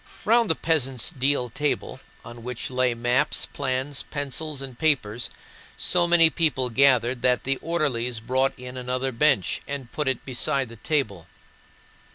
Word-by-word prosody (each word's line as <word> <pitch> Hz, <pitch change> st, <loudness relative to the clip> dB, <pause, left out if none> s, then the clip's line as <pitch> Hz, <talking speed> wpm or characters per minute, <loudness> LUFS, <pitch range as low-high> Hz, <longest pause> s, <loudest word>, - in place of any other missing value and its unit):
Round 230 Hz, 0 st, +4 dB
the 160 Hz, -, +3 dB
peasant's 135 Hz, -7 st, 0 dB
deal 135 Hz, -2 st, 0 dB
table, 150 Hz, +4 st, -2 dB, 0.3 s
on 120 Hz, +1 st, -10 dB
which 125 Hz, +1 st, -4 dB
lay 125 Hz, -1 st, +1 dB
maps, 120 Hz, +5 st, +1 dB
plans, 135 Hz, 0 st, -3 dB
pencils, 145 Hz, +1 st, -3 dB
and 130 Hz, -3 st, -8 dB
papers, 125 Hz, -8 st, 0 dB, 0.5 s
so 175 Hz, -1 st, +2 dB
many 165 Hz, -2 st, +6 dB
people 135 Hz, -7 st, 0 dB
gathered 125 Hz, -1 st, +3 dB
that 125 Hz, 0 st, +2 dB
the 135 Hz, 0 st, +1 dB
orderlies 125 Hz, -8 st, -1 dB
brought 130 Hz, +4 st, 0 dB
in 125 Hz, 0 st, -8 dB
another 125 Hz, +1 st, -2 dB
bench 125 Hz, -, +2 dB
and 140 Hz, -3 st, -6 dB
put 150 Hz, -2 st, -2 dB
it 130 Hz, -2 st, -1 dB
beside 135 Hz, 0 st, +1 dB
the 115 Hz, -, -11 dB
table. 110 Hz, -, -1 dB
130 Hz, 150 wpm, -25 LUFS, 125-150 Hz, 0.5 s, many